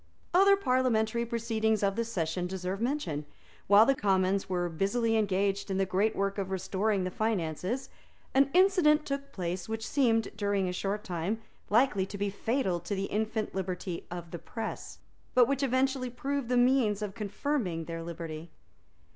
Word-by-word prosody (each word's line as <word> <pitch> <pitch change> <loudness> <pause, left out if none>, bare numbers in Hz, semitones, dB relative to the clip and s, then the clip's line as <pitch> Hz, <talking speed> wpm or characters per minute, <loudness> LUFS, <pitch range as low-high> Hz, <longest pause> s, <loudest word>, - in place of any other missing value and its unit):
Other 395 +2 +6
parliamentary 235 - +1
proceedings 220 -2 0
of 195 0 +2
this 230 0 -2
session 175 0 -1
deserve 190 +2 -4
mention. 235 - -1 0.4
While 205 +2 +8
the 275 - +4
Commons 195 -4 +1
were 175 -1 0
busily 225 +7 0
engaged 200 -1 +1
in 190 - -1
the 195 - +2
great 195 +4 +1
work 200 +1 -1
of 190 -1 -2
restoring 190 +2 0
the 185 - -2
finances, 210 - -2 0.5
an 275 +1 +4
incident 350 -5 +4
took 275 0 -4
place 180 +2 -4
which 220 0 -3
seemed, 230 -5 +2
during 200 -2 0
a 180 - -2
short 200 +3 -2
time, 180 +5 -2 0.3
likely 210 -4 +3
to 200 - -7
be 200 0 -1
fatal 205 -4 0
to 175 +4 -4
the 195 0 -1
infant 220 0 -1
liberty 185 -2 -4
of 175 -1 -7
the 170 - -5
press, 225 +6 -6 0.4
but 245 -2 +6
which 275 0 0
eventually 265 -1 +1
proved 270 +1 -3
the 250 - +2
means 245 -5 +3
of 200 -2 -4
confirming 205 - -2
that 165 0 -5
liberty. 165 -1 -6
210 Hz, 165 wpm, -30 LUFS, 185-245 Hz, 0.5 s, While